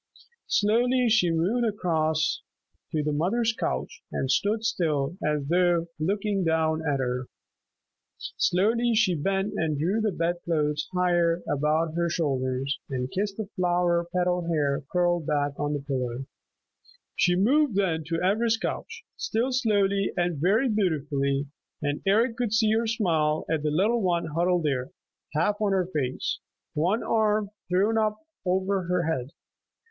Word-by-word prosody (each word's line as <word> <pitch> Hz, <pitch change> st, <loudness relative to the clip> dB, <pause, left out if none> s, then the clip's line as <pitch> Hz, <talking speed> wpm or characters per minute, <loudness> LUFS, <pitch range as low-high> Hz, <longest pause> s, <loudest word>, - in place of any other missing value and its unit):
Slowly 240 Hz, +4 st, +2 dB
she 215 Hz, -6 st, +4 dB
moved 180 Hz, +9 st, +1 dB
across 160 Hz, -7 st, 0 dB, 0.5 s
to 155 Hz, -1 st, 0 dB
the 150 Hz, -, 0 dB
mother's 215 Hz, +10 st, +1 dB
couch -, -, -3 dB
and 135 Hz, -, -1 dB
stood 215 Hz, +2 st, +1 dB
still 155 Hz, -7 st, 0 dB
as 150 Hz, -2 st, 0 dB
though 175 Hz, 0 st, +2 dB
looking 200 Hz, +3 st, 0 dB
down 160 Hz, -1 st, +1 dB
at 145 Hz, -3 st, 0 dB
her. 125 Hz, 0 st, -2 dB, 0.9 s
Slowly 230 Hz, +6 st, +1 dB
she 210 Hz, -5 st, +3 dB
bent 195 Hz, +5 st, -1 dB
and 155 Hz, -2 st, 0 dB
drew 185 Hz, +9 st, 0 dB
the 215 Hz, -1 st, +1 dB
bed 170 Hz, 0 st, -1 dB
clothes 150 Hz, -2 st, 0 dB
higher 175 Hz, -2 st, +2 dB
about 155 Hz, +3 st, +1 dB
her 170 Hz, 0 st, 0 dB
shoulders, 135 Hz, -4 st, -1 dB
and 130 Hz, -1 st, -3 dB
kissed 200 Hz, +1 st, -2 dB
the 220 Hz, -, -3 dB
flower 175 Hz, -2 st, +1 dB
petal 180 Hz, -1 st, 0 dB
hair 150 Hz, -3 st, 0 dB
curled 175 Hz, -3 st, +1 dB
back 145 Hz, -2 st, +1 dB
on 145 Hz, 0 st, -1 dB
the 145 Hz, -, -2 dB
pillow. 130 Hz, -2 st, -3 dB, 0.9 s
She 175 Hz, -1 st, +3 dB
moved 255 Hz, +6 st, +3 dB
then 170 Hz, -5 st, +1 dB
to 165 Hz, 0 st, -1 dB
Ivra's 225 Hz, +3 st, +2 dB
couch, 465 Hz, -, -5 dB
still 235 Hz, +4 st, -1 dB
slowly 200 Hz, -5 st, +1 dB
and 175 Hz, -4 st, 0 dB
very 215 Hz, -, +3 dB
beautifully, 145 Hz, -, 0 dB, 0.4 s
and 145 Hz, 0 st, -1 dB
Eric 225 Hz, +4 st, +3 dB
could 240 Hz, -3 st, -1 dB
see 220 Hz, -1 st, +3 dB
her 225 Hz, +1 st, +1 dB
smile 160 Hz, -9 st, +1 dB
at 160 Hz, -2 st, +1 dB
the 150 Hz, -, 0 dB
little 210 Hz, +10 st, +2 dB
one 175 Hz, -3 st, +1 dB
huddled 175 Hz, 0 st, +2 dB
there, 135 Hz, -4 st, -1 dB, 0.5 s
half 205 Hz, +7 st, +1 dB
on 205 Hz, -2 st, +2 dB
her 185 Hz, -2 st, +2 dB
face, 140 Hz, -7 st, -2 dB, 0.3 s
one 180 Hz, +9 st, +1 dB
arm 215 Hz, -2 st, +1 dB, 0.2 s
thrown 205 Hz, +5 st, +2 dB
up 215 Hz, -1 st, +1 dB, 0.3 s
over 190 Hz, +1 st, +1 dB
her 180 Hz, 0 st, 0 dB
head. 135 Hz, -6 st, -2 dB
175 Hz, 150 wpm, -26 LUFS, 150-210 Hz, 0.9 s, she